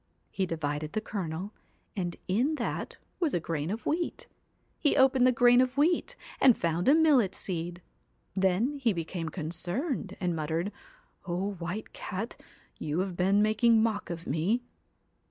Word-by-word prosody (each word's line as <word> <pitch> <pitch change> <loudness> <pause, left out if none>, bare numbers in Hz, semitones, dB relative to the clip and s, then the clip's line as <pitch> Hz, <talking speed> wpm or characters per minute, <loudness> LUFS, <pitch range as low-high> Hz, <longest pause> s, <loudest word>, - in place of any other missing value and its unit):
He 190 -2 -1
divided 150 -2 -3
the 215 - +1
kernel, 190 -1 -4 0.4
and 175 -3 -2
in 245 +12 +2
that - - -3 0.2
was 330 -6 +1
a - - +2
grain 160 -1 -3
of 220 +4 -4
wheat. 335 +3 -1 0.5
He 295 - +2
opened 265 -1 +5
the - - +6
grain 245 +1 +6
of 255 +1 0
wheat, 345 +11 +2 0.2
and 255 -4 +6
found 170 +5 +1
a 290 - +7
millet 285 - +4
seed. 175 -1 -4 0.5
Then 195 +9 +1
he 245 -6 +2
be 165 -3 -3
came 165 -2 -4
concerned, 185 - -3
and 175 -2 0
muttered: 165 +5 -1 0.3
' - - -30
O 185 +3 -1
White 180 +3 -5
Cat, 200 +6 -5 0.4
you 155 +4 -1
have 190 -2 -3
been 195 +3 +3
making 220 +1 +4
mock 215 -3 -1
of 170 0 -5
me 185 - 0
195 Hz, 160 wpm, -29 LUFS, 170-245 Hz, 0.5 s, a